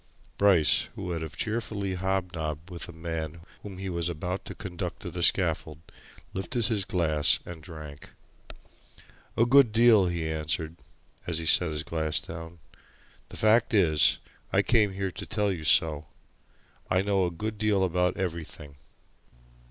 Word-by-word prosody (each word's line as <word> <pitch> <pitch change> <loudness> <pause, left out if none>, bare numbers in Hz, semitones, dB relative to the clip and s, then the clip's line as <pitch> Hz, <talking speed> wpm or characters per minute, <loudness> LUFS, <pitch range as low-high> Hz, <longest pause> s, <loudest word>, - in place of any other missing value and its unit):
Bryce, 95 -6 +4
who - - -7
would 85 -2 -3
have 80 +1 -7
cheerfully 105 -3 -2
hobnobbed 90 -3 -3
with 85 -1 -6
a - - -6
man 80 -1 -5 0.2
whom 100 -3 -9
he 95 +1 -5
was 85 -2 -2
about 90 +3 -4
to - - -7
conduct 90 -4 -6
to - - -5
the - - -5
scaffold, 75 -2 +2 0.6
lifted 115 +5 -2
his 100 -2 0
glass 80 -3 +3
and 85 -3 -9
drank. 75 -3 -10 1.3
"A 115 - +4
good 130 -1 +6
deal," 110 -4 +5
he 85 -2 -2
answered 80 +1 -2 0.5
as 85 -2 -1
he 80 - -4
set 80 +1 +3
the 75 0 -2
glass 80 0 -1
down. 80 +1 -9 0.7
"The - - -8
fact 110 +1 +3
is 80 -6 +4 0.3
I - - +3
came 105 -5 +3
here 95 0 -3
to 80 - -7
tell 105 -1 0
you 85 -4 -5
so! 75 -1 +3 0.8
I 95 +1 +2
know 100 -2 +1
a - - -1
good 105 +5 -5
deal 105 -3 +2
about 90 0 0
everything." 80 -6 -5
90 Hz, 155 wpm, -27 LUFS, 80-100 Hz, 1.3 s, good